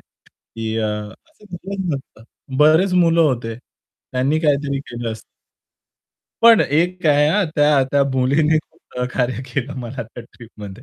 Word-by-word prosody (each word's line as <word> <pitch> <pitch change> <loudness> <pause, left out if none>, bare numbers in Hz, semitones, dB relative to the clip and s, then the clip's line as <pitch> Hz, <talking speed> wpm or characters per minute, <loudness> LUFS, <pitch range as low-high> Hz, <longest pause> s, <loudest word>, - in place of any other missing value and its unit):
की 110 0 -9
अ, 110 - 0 0.4
असं 305 -9 -23
झालंच 190 +2 -5
नसतं. 130 -4 -10 0.3
बरेच 160 +6 +4
मुलं 170 -2 +4
होते, 120 -7 0 0.6
त्यांनी 135 +5 +1
काहीतरी 140 -3 0
केलं 120 -4 -6
असतं. 110 - -10 1.2
पण 230 -1 +7
एक 175 +5 0
काय 150 -3 +4
आहे, 150 +1 +4
हा 205 +4 +2
त्या 145 -2 +4
त्या 140 -1 +3
मुलीने 145 +5 +2
खूप 155 - -13 0.2
सहकार्य 125 0 -2
केलं 135 +2 -3
मला 125 +1 -6
त्या 115 +2 -11
ट्रिपमध्ये. 110 -2 -11
140 Hz, 145 wpm, -20 LUFS, 125-160 Hz, 1.2 s, पण